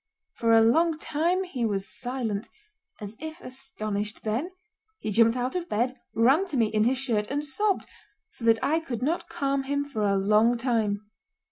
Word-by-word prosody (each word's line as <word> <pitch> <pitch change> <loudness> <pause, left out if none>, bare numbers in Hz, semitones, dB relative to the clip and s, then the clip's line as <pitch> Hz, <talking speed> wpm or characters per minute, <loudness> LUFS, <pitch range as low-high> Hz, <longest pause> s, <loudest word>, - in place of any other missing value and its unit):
For 230 -1 +1
a 225 0 +7
long 320 +8 +3
time 330 +5 0
he 280 -10 -4
was 200 -3 0
silent, 245 -5 -2 0.5
as 210 0 -7
if 315 +2 -7
astonished, 215 - -4
then 230 +11 -1 0.5
he 215 - -4
jumped 230 +3 +4
out 250 +6 -2
of 355 -1 -3
bed, 245 +4 0 0.2
ran 270 - +4
to 300 -7 -3
me 230 - +4
in 215 0 +2
his 255 +2 +2
shirt, 230 -6 -1
and 290 +2 -1
sobbed 395 +8 +1 0.4
so - - -11
that 225 -1 +5
I 315 +3 +2
could 255 -8 -5
not 325 +6 -1
calm 275 0 0
him 285 +1 -1
for 275 -6 -5
a 200 -1 +2
long 215 +5 +3
time. 220 -4 0
245 Hz, 180 wpm, -27 LUFS, 220-290 Hz, 0.5 s, a